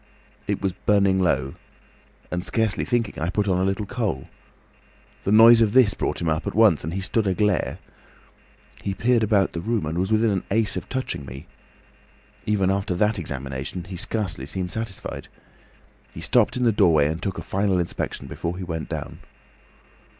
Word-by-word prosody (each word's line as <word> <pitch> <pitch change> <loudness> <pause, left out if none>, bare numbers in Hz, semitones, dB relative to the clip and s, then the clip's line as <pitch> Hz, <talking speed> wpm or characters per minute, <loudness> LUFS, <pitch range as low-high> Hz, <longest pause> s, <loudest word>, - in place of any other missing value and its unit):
It - - -2
was 95 -2 0
burning 100 0 +2
low, 75 -7 +1 0.8
and 90 0 -2
scarcely 110 +1 +1
thinking, 120 -3 -1
I 85 - 0
put 100 +2 0
on 90 -2 +2
a - - +1
little 95 +2 -1
coal. 105 - -3 1.0
The 100 - +1
noise 115 +2 +8
of 110 -2 +3
this 125 -7 +5
brought - - -2
him 85 - -1
up 80 0 -1
at - - -3
once, 110 -8 +5
and 80 +4 -4
he 95 - -2
stood 105 +2 0
aglare. 100 0 0 1.0
He 95 - -3
peered 120 +1 +2
about 105 -3 +2
the 85 - -4
room 110 -2 -1
and 80 +3 -2
was 95 +3 -1
within 110 0 +3
an 95 -2 -1
ace 110 0 +1
of - - -5
touching 130 - -3
me. 65 +2 -9 1.0
Even 100 -3 +2
after 95 -2 -1
that 105 +2 +1
examination, 70 +2 -5
he 95 +1 -8
scarcely 95 -7 -3
seemed 90 +2 -4
satisfied. 110 -4 -5 0.8
He - - -10
stopped - - +2
in 125 - 0
the 120 - +4
doorway 85 -8 +4
and 80 +3 -2
took 95 -2 -3
a - - -5
final 95 -1 0
inspection 85 -1 -3
before 85 +1 -4
he 95 - -5
went 80 -3 -5
down. - - -6
95 Hz, 180 wpm, -24 LUFS, 85-110 Hz, 1.0 s, noise